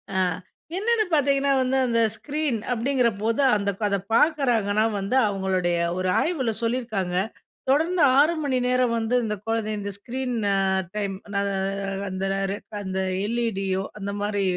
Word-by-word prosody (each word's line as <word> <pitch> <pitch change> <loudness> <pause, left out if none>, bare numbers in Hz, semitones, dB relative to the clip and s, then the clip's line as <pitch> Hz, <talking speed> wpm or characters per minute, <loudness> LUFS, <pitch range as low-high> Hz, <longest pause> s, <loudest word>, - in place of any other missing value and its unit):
அ - - +2 0.6
என்னென்னு 435 +1 +2
பார்த்தீங்கன்னா 280 -1 +3
வந்து, 260 +1 +1
அந்த 230 -1 +1 0.2
ஸ்க்ரீன் 295 -4 -2 0.2
அப்டிங்கிறபோது, 235 -2 +1
அந்த 200 -1 0 0.2
அதப் 200 -1 -2
பார்க்குறாங்கன்னா 230 -8 +3
வந்து, 195 +6 -1
அவங்களுடைய 190 -3 0 0.2
ஒரு 185 0 0
ஆய்வுல 270 -9 0
சொல்லிருக்காங்க. 225 -7 -1 0.6
தொடர்ந்து 325 +4 +2
6 295 +4 +5
மணி 280 -4 0
நேரம் 250 -1 +2
வந்து 225 +1 -1
இந்த 210 -1 -1
கொழந்த 225 -1 -1
இந்த 200 0 -4
ஸ்கிரீன 245 -1 -2 0.3
அ - - -3
டைம். 200 -2 -1 0.2
ந - - 0 0.2
அ 195 +1 -2 0.2
அந்த 190 0 -3 0.3
ரே 200 - -2 0.3
அந்த 190 -1 -3 0.3
எல்இடியோ 195 -5 -1 0.2
அந்த 200 -1 -4
மாரி 205 0 -1
225 Hz, 140 wpm, -24 LUFS, 200-265 Hz, 0.6 s, 6